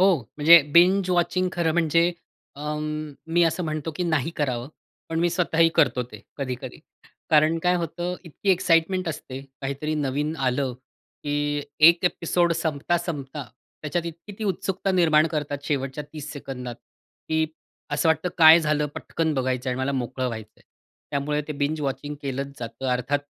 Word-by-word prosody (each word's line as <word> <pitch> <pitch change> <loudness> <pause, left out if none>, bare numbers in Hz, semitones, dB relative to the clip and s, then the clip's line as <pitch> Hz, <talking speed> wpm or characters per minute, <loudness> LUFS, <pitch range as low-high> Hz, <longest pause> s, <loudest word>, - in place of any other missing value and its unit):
हो. 190 -2 +5 0.2
म्हणजे 160 +2 +8
binge 185 +3 +5
watching 180 +1 +1
खरं 170 -2 +1
म्हणजे 170 +1 +3 0.4
अ, 150 +1 -3 0.6
मी 175 - +6
असं 165 +2 0
म्हणतो, 155 0 -3
की - - -1
नाही 160 -2 0
करावं. 130 -4 -1 0.4
पण 165 - -2
मी 175 0 +2
स्वतःही 165 -2 +3
करतो 125 - +3
ते - - -11 0.2
कधी-कधी. 130 -2 -5 0.5
कारण 155 +2 +4
काय 180 0 +3
होतं, 175 +1 -3
इतकी 170 +4 -2
एक्साईटमेंट 180 0 +2
असते. 135 -3 -6 0.2
काहीतरी 140 +3 -3
नवीन 145 +1 -1
आलं 130 -1 0
की 145 +3 -4 0.3
एक 170 +1 +3
एपिसोड 175 0 +2
संपता-संपता 155 -2 -2 0.4
त्याच्यात 170 +3 -2
इतकी 170 +5 -8
ती 220 - -3
उत्सुकता 195 0 -1
निर्माण 160 -4 +4
करतात 145 -2 -3
शेवटच्या 140 0 -2
30 150 -2 -7
सेकंदात, 130 -4 -6 0.5
की 160 0 +2 0.4
असं 145 +2 +1
वाटतं, 160 +3 +2
काय 160 0 +9
झालं? 150 -1 +1
पटकन 160 -2 -2
बघायचं 130 -1 -1
आहे 125 - 0
आणि - - -3
मला 140 - 0
मोकळं 130 +1 -3
व्हायचंय. 110 -3 -7 0.5
त्यामुळे 150 +1 -1
ते - - -2
बिंज 150 +2 -1
वॉचिंग 145 +1 -3
केलंच 140 +1 -4
जातं. 115 +2 -6
अर्थात 125 +3 0
150 Hz, 155 wpm, -24 LUFS, 140-170 Hz, 0.6 s, काय